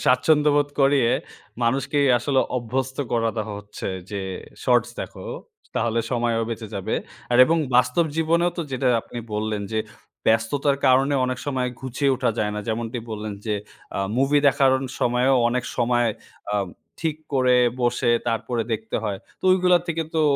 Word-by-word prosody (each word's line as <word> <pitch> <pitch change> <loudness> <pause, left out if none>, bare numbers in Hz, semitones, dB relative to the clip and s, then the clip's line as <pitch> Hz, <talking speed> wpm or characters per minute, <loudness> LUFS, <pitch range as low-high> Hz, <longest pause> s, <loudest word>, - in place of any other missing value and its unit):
স্বাচ্ছন্দ্যবোধ 145 +2 +4
করিয়ে 135 -3 +4 0.5
মানুষকেই 135 +4 +1
আসলে 135 +2 +1 0.2
অভ্যস্ত 130 +2 -2 0.2
করা 115 -1 +2
দেওয়া 110 -1 -3
হচ্ছে 105 0 -7 0.2
যে 100 -1 -3 0.4
শর্টস - - +3
দেখো - - -7 0.5
তাহলে 115 0 0
সময়ও 115 -2 +1
বেঁচে 115 -1 -5
যাবে 95 - -2 0.4
আর 120 - +4
এবং 165 +5 +2 0.2
বাস্তব 125 +6 +3
জীবনেও 170 +2 +2
তো 170 - -1
যেটা 130 0 +1
আপনি 120 - -9 0.2
বললেন 105 -1 -2
যে 110 - +1 0.5
ব্যস্ততার 125 +6 +2
কারণে 135 +2 +4
অনেক 130 0 -2
সময় 130 -3 0
ঘুচিয়ে 135 +1 0
ওঠা - - +1
যায় 105 -1 0
না। 105 - -3
যেমনটি 115 +2 -2
বললেন 105 -1 -4
যে 105 - +1 0.4
আ - - -1 0.2
মুভি 135 +3 +3
দেখার 135 -1 +4
অন 130 - -4 0.2
সময়ও 125 +2 +3
অনেক 125 +1 -1
সময় 120 -1 +2 0.5
আব 100 -1 0 0.3
ঠিক 160 -2 -1 0.2
করে 125 -1 +4 0.2
বসে 120 -1 +2 0.2
তারপরে 115 +1 -1
দেখতে 110 0 -2
হয়। 100 -3 -2 0.2
তো - - -12
ঐগুলা 180 -1 +4
থেকে 165 -1 -1
তো 160 - +3
125 Hz, 155 wpm, -23 LUFS, 115-140 Hz, 0.5 s, স্বাচ্ছন্দ্যবোধ